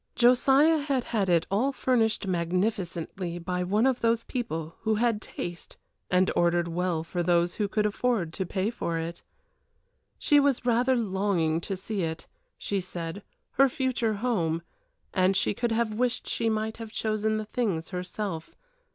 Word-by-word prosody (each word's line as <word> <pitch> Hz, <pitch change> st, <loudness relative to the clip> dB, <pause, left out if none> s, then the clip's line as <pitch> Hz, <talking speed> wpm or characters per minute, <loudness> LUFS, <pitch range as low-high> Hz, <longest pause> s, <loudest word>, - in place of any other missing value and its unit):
Josiah 270 Hz, +6 st, +5 dB
had 280 Hz, -3 st, 0 dB
had 205 Hz, -6 st, -1 dB
it 170 Hz, -2 st, +3 dB
all 240 Hz, +8 st, +2 dB
furnished 230 Hz, -5 st, +1 dB
magnificently 180 Hz, -1 st, -2 dB
by 180 Hz, +1 st, -2 dB
one 205 Hz, +6 st, +2 dB
of 260 Hz, -2 st, +2 dB
those 230 Hz, 0 st, +2 dB
people 165 Hz, -, -4 dB
who 220 Hz, -1 st, +1 dB
had 225 Hz, -1 st, +1 dB
taste 175 Hz, -5 st, -7 dB, 0.3 s
and 180 Hz, +1 st, +3 dB
ordered 175 Hz, 0 st, +2 dB
well 170 Hz, -1 st, -1 dB
for 175 Hz, +2 st, -3 dB
those 175 Hz, 0 st, +2 dB
who 205 Hz, -, +2 dB
could 210 Hz, +1 st, 0 dB
afford 210 Hz, -5 st, 0 dB
to 190 Hz, -, -2 dB
pay 190 Hz, +4 st, -1 dB
for 170 Hz, -8 st, -2 dB
it. 165 Hz, +1 st, -4 dB, 1.0 s
She 295 Hz, -2 st, +4 dB
was 280 Hz, -3 st, +2 dB
rather 250 Hz, +2 st, +3 dB
longing 190 Hz, -7 st, 0 dB
to 195 Hz, -, -3 dB
see 200 Hz, +1 st, -3 dB
it, 160 Hz, -1 st, -3 dB, 0.3 s
she 200 Hz, -1 st, -2 dB
said 175 Hz, +1 st, -6 dB, 0.3 s
her 275 Hz, +1 st, +4 dB
future 245 Hz, -4 st, 0 dB
home 175 Hz, -8 st, 0 dB, 0.5 s
and 190 Hz, 0 st, +3 dB
she -, -, +1 dB
could 235 Hz, +3 st, -1 dB
have 225 Hz, -1 st, +1 dB
wished 245 Hz, +2 st, -1 dB
she 230 Hz, -1 st, 0 dB
might 220 Hz, 0 st, -1 dB
have 225 Hz, -1 st, -8 dB
chosen 215 Hz, 0 st, 0 dB
the 215 Hz, -, -3 dB
things 205 Hz, -8 st, -2 dB
herself. 180 Hz, -2 st, -5 dB
205 Hz, 160 wpm, -27 LUFS, 175-235 Hz, 1.0 s, Josiah